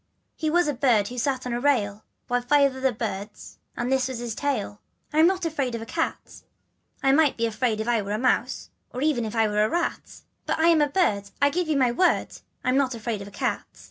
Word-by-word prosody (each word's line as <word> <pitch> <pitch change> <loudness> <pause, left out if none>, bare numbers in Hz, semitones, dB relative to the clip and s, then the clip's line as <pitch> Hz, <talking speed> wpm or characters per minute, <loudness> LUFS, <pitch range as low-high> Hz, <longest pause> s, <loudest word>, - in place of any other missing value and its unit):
" - - -49
He 315 - -1
was 350 +1 +3
a 295 - 0
bird 240 -6 +2
who 250 0 -5
sat 260 0 -1
on 250 - -3
a 240 - -1
rail, 220 -7 +1 0.2
With 245 0 -1
five 280 0 +4
other 265 0 +1
birds, 210 -2 -6 0.2
and 240 +2 -2
this 265 -1 +2
was 260 -2 -5
his 235 -1 -4
tale. 235 -6 -3
" - - -36
I'm 315 +2 +6
not 370 -1 0
afraid 275 -7 -1
of 230 - -5
a - - -8
cat. 325 +7 -4 0.2
" - - -48
" - - -35
I 270 - +4
might 295 0 +3
be 230 - +1
afraid 225 0 -1
if 220 - -3
I 235 -2 +2
were 200 +1 -4
a - - 0
mouse, 255 +3 0 0.2
Or 255 - -4
even 280 -7 +1
if 220 +1 -5
I 225 -1 +3
were 210 0 +1
a 215 - +1
rat: 345 0 -3 0.3
But - - 0
as 320 - +2
I'm 335 -2 +5
a 295 - +2
bird 210 - +1
I 285 0 +4
give 355 +2 -1
you 310 -2 +1
my 255 -3 +3
word 360 +9 +2 0.3
I'm 255 +1 +2
not 265 -3 +1
afraid 225 -2 -4
of 200 - -8
a - - -9
cat. - - -2
255 Hz, 260 wpm, -25 LUFS, 225-290 Hz, 0.3 s, I'm